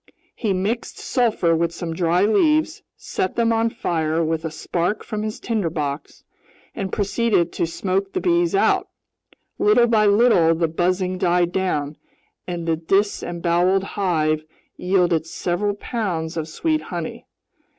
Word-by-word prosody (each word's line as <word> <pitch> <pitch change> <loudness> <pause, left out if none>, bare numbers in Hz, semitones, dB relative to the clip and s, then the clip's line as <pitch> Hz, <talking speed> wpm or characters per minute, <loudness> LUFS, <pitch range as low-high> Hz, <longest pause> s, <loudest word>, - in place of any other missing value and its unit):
He 220 -4 -2
mixed 200 +6 -2
sulfur 220 -10 +1
with 170 0 0
some 170 -1 -5
dry 175 +3 +2
leaves, 305 +9 +2 0.2
set 185 - -3
them 230 -1 +2
on 225 0 +2
fire 165 -8 -1
with 160 0 -1
a 160 - -2
spark 175 +5 -2
from 215 -1 -4
his 215 0 -4
tinderbox, 160 -10 -3 0.5
and 190 -1 -4
proceeded 205 -3 +1
to 170 - -1
smoke 190 +3 -2
the - - 0
bees 345 +1 +2
out. 395 - +2 0.7
Little 330 - +5
by 220 -3 +3
little 200 -6 +4
the 165 0 +1
buzzing 180 +3 -1
died 175 -1 +2
down 150 -6 -1 0.5
and 170 -2 -4
the 165 -1 +1
disemboweled 175 0 +1
hive 155 -6 0 0.3
yielded 180 -3 +1
several 180 +5 -1
pounds 185 -8 -3
of 160 -2 -3
sweet 310 - -1
honey. - - -6
185 Hz, 140 wpm, -22 LUFS, 165-215 Hz, 0.7 s, Little